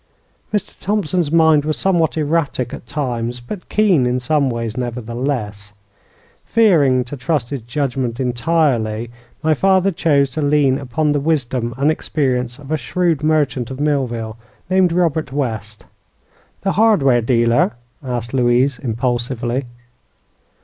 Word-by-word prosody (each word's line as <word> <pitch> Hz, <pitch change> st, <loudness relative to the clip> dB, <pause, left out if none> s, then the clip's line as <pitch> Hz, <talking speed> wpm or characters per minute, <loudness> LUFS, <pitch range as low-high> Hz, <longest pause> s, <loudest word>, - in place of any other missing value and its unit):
Mr. 210 Hz, -2 st, -2 dB
Thompson's 185 Hz, -6 st, 0 dB
mind 160 Hz, -3 st, +4 dB
was 155 Hz, 0 st, -2 dB
somewhat 170 Hz, -4 st, +1 dB
erratic 150 Hz, -5 st, -1 dB
at -, -, -9 dB
times, 120 Hz, -3 st, -3 dB
but 150 Hz, +11 st, -8 dB
keen 185 Hz, -12 st, +3 dB
in 125 Hz, +1 st, 0 dB
some 140 Hz, +2 st, +1 dB
ways, 115 Hz, -2 st, -3 dB
nevertheless. 120 Hz, -4 st, -4 dB, 0.7 s
Fearing 155 Hz, -, +3 dB
to 125 Hz, +4 st, -7 dB
trust 135 Hz, -2 st, -1 dB
his 140 Hz, -3 st, -3 dB
judgment 125 Hz, 0 st, -2 dB
entirely, 120 Hz, -4 st, 0 dB, 0.3 s
my 160 Hz, 0 st, +3 dB
father 190 Hz, +4 st, +3 dB
chose 140 Hz, -5 st, +2 dB
to 155 Hz, -, -3 dB
lean 145 Hz, -2 st, +2 dB
upon 145 Hz, +3 st, -1 dB
the 145 Hz, -, +1 dB
wisdom 130 Hz, -6 st, -1 dB
and 140 Hz, +3 st, +3 dB
experience 125 Hz, -6 st, -1 dB
of 145 Hz, 0 st, -11 dB
a 155 Hz, -, +2 dB
shrewd 165 Hz, +2 st, 0 dB
merchant 145 Hz, -6 st, +1 dB
of 130 Hz, 0 st, -7 dB
Millville, 120 Hz, -7 st, -1 dB, 0.3 s
named 185 Hz, -2 st, +4 dB
Robert 160 Hz, -5 st, 0 dB
West." 110 Hz, -6 st, -4 dB, 0.8 s
"The 195 Hz, -, 0 dB
hardware 165 Hz, -, +4 dB
dealer?" 115 Hz, -1 st, +2 dB, 0.3 s
asked 120 Hz, -2 st, -4 dB
Louise, 125 Hz, +1 st, +2 dB
impulsively. 120 Hz, +1 st, -2 dB
135 Hz, 130 wpm, -19 LUFS, 120-155 Hz, 0.8 s, mind